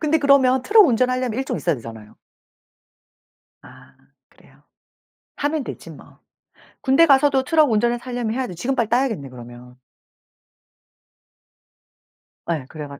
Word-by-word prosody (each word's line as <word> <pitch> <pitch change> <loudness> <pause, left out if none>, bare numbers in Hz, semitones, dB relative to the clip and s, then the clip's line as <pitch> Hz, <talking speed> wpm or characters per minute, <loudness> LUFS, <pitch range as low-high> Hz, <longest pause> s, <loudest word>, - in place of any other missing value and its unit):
근데 315 +1 +1
그러면 270 -3 +3
트럭 420 - +5
운전하려면 255 -1 0
1 265 - -2
종 - - -4
있어야 170 -3 -1
되잖아요. 110 -3 -12 1.5
아 - - -18 0.3
그래요? - - -24 0.8
하면 290 0 -2
되지 - - -9
뭐. - - -16 0.6
군대 270 +5 +3
가서도 275 -2 +3
트럭 305 -1 +2
운전을 235 +3 +1
하려면 240 -2 -4
해야지. 250 -7 -4
지금 245 +11 -3
빨리 235 -4 -1
따야겠네 230 - -1
그러면. 125 0 -14 2.7
예. 160 -6 -3
그래가 145 -2 -9
245 Hz, 275 characters per minute, -20 LUFS, 160-270 Hz, 2.7 s, 트럭